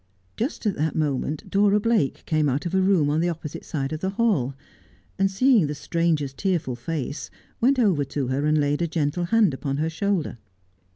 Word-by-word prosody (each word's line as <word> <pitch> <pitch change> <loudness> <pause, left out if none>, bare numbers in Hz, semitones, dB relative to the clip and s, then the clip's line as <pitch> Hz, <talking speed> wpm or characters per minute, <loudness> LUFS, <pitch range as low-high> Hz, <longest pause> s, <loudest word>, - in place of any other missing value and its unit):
Just 240 +1 -3
at 210 - +2
that 155 +1 -1
moment 150 -1 -1
Dora 205 +1 +3
Blake 215 -10 0
came 155 -3 +1
out 135 +6 -1
of 175 - -3
a 190 - +3
room 185 -7 +3
on 155 - +1
the 175 +1 +1
opposite 165 -3 -6
side 140 -1 -3
of 155 - -3
the 190 - -1
hall, 195 - +1 0.6
and 195 0 +3
seeing 220 - +3
the 150 - -4
stranger's 155 -2 0
tearful 170 -7 -1
face, 140 +3 -4 0.3
went 265 +4 +3
over 195 - +3
to 135 -1 -3
her 140 +3 0
and 155 0 +3
laid 145 +1 +1
a 170 - +1
gentle 160 +2 -1
hand 210 -3 +3
upon 135 +1 -3
her 160 +2 -1
shoulder. 180 - -1
160 Hz, 195 wpm, -24 LUFS, 145-195 Hz, 0.6 s, Dora